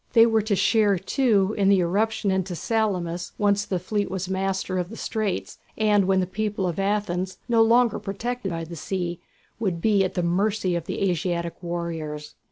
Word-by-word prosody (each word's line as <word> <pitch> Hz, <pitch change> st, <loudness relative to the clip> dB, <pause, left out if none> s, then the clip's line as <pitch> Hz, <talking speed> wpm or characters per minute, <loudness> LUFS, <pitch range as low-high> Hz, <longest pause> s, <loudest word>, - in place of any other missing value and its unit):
They 230 Hz, -1 st, +8 dB
were 225 Hz, -1 st, +3 dB
to 210 Hz, -1 st, 0 dB
share, 205 Hz, 0 st, +3 dB
too, 205 Hz, 0 st, +2 dB
in 195 Hz, -1 st, +4 dB
the 195 Hz, -2 st, +5 dB
irruption 205 Hz, +3 st, +1 dB
into 190 Hz, -1 st, -1 dB
Salamis 180 Hz, -5 st, -1 dB
once 205 Hz, -1 st, +2 dB
the 190 Hz, -, -1 dB
fleet 205 Hz, +3 st, -2 dB
was 190 Hz, -1 st, -3 dB
master 190 Hz, 0 st, -1 dB
of 175 Hz, 0 st, -3 dB
the 225 Hz, -, -9 dB
straits, 200 Hz, -, -3 dB, 0.2 s
and 210 Hz, -2 st, +3 dB
when 190 Hz, -1 st, +3 dB
the -, -, 0 dB
people 205 Hz, 0 st, -2 dB
of 175 Hz, +1 st, -3 dB
Athens, 195 Hz, -2 st, -1 dB
no 230 Hz, -2 st, +4 dB
longer 235 Hz, +1 st, +4 dB
protected 215 Hz, +2 st, -4 dB
by 165 Hz, -1 st, -3 dB
the 165 Hz, +1 st, -8 dB
sea, 175 Hz, 0 st, -3 dB, 0.4 s
would 190 Hz, -7 st, -1 dB
be 205 Hz, +1 st, +3 dB
at 185 Hz, -, -2 dB
the 180 Hz, -, 0 dB
mercy 185 Hz, +1 st, +1 dB
of 170 Hz, -1 st, -3 dB
the 195 Hz, -, -1 dB
Asiatic 170 Hz, 0 st, -2 dB
warriors. 165 Hz, -4 st, -4 dB
195 Hz, 185 wpm, -25 LUFS, 175-215 Hz, 0.4 s, They